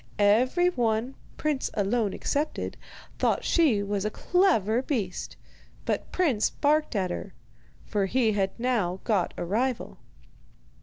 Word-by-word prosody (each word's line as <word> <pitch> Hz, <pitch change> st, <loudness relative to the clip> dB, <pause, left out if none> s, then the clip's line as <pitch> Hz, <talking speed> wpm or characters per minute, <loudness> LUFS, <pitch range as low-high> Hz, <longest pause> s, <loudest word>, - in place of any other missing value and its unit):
Every 250 Hz, -, +4 dB
one 235 Hz, -2 st, 0 dB, 0.2 s
Prince 300 Hz, -3 st, -1 dB
alone 210 Hz, 0 st, +1 dB
excepted, 295 Hz, +9 st, -2 dB, 0.4 s
thought -, -, +1 dB
she 270 Hz, -12 st, +3 dB
was 200 Hz, -1 st, -2 dB
a 215 Hz, -, 0 dB
clever 245 Hz, -, +2 dB
beast; 220 Hz, -10 st, -3 dB, 0.5 s
but -, -, -2 dB
Prince 285 Hz, -, +2 dB
barked 300 Hz, -2 st, +1 dB
at 185 Hz, -3 st, 0 dB
her, 185 Hz, +2 st, -6 dB, 0.5 s
for 200 Hz, -3 st, 0 dB
he 230 Hz, +1 st, +2 dB
had 195 Hz, -2 st, +1 dB
now 215 Hz, -7 st, 0 dB
got 200 Hz, -6 st, +1 dB
a -, -, -3 dB
rival. 235 Hz, +7 st, -1 dB
225 Hz, 125 wpm, -27 LUFS, 200-270 Hz, 0.5 s, Every